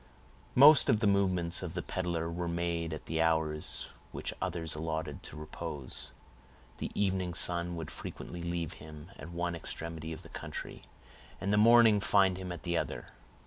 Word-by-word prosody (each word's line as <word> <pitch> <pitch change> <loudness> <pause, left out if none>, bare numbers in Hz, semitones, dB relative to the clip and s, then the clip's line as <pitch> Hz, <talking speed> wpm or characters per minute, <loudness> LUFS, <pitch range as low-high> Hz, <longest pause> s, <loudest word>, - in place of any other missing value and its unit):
Most 145 +3 +8
of 110 - +5
the 110 - +1
movements 95 -4 +2
of - - -5
the - - -2
peddler 85 -3 -2
were 85 +1 -3
made 85 -1 -1
at 80 - -6
the 80 0 0
hours 80 -2 0 0.2
which - - -3
others 85 -3 -1
allotted 80 -1 -3
to 75 - -9
repose. 75 -3 -6 0.7
The - - -3
evening 95 -3 0
sun 85 0 +1
would 80 -2 -5
frequently 85 0 -7
leave 85 -2 -2
him 80 +3 -10
at 80 - -8
one 85 0 -2
extremity 80 -1 -5
of 80 +3 -6
the 85 - -12
county, - - -7 0.6
and 100 +1 0
the - - +4
morning 115 -1 +7
find 95 -2 +3
him 90 -1 -5
at 85 - -7
the 85 -1 -1
other. - - -5
85 Hz, 170 wpm, -32 LUFS, 80-95 Hz, 0.7 s, Most